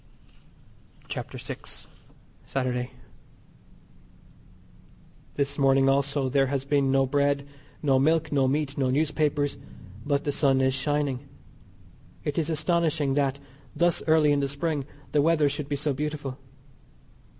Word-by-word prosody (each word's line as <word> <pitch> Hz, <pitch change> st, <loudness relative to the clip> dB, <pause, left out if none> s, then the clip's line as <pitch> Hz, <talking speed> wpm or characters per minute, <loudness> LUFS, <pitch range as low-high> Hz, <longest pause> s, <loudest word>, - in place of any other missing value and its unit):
CHAPTER -, -, -5 dB
VI. -, -, -6 dB, 0.9 s
SATURDAY. 125 Hz, -2 st, -1 dB, 2.5 s
This 140 Hz, 0 st, -1 dB
morning 135 Hz, 0 st, +4 dB
also 140 Hz, 0 st, +1 dB
there 135 Hz, +1 st, +2 dB
has 135 Hz, 0 st, -2 dB
been 140 Hz, -1 st, +2 dB
no 135 Hz, 0 st, +3 dB
bread, 140 Hz, +1 st, +1 dB, 0.4 s
no 135 Hz, -3 st, +4 dB
milk, 155 Hz, +3 st, +2 dB
no 135 Hz, -2 st, +3 dB
meat, 145 Hz, +1 st, -1 dB
no 130 Hz, -2 st, +2 dB
newspapers, 145 Hz, 0 st, +1 dB, 0.5 s
but 145 Hz, 0 st, 0 dB
the 145 Hz, -, 0 dB
sun 140 Hz, -2 st, +2 dB
is 130 Hz, 0 st, +2 dB
shining. 140 Hz, -1 st, -1 dB, 0.9 s
It 150 Hz, +2 st, -1 dB
is 160 Hz, -1 st, -1 dB
astonishing 155 Hz, -3 st, +1 dB
that, 140 Hz, -1 st, 0 dB, 0.4 s
thus 175 Hz, -1 st, +3 dB
early 155 Hz, -2 st, +5 dB
in 145 Hz, -, +3 dB
the 140 Hz, -, 0 dB
Spring, 145 Hz, 0 st, -2 dB, 0.3 s
the 150 Hz, -, +3 dB
weather 155 Hz, -1 st, +3 dB
should 145 Hz, 0 st, -4 dB
be 145 Hz, -, 0 dB
so 145 Hz, 0 st, -1 dB
beautiful. 145 Hz, -1 st, -4 dB
140 Hz, 130 wpm, -26 LUFS, 135-150 Hz, 2.5 s, early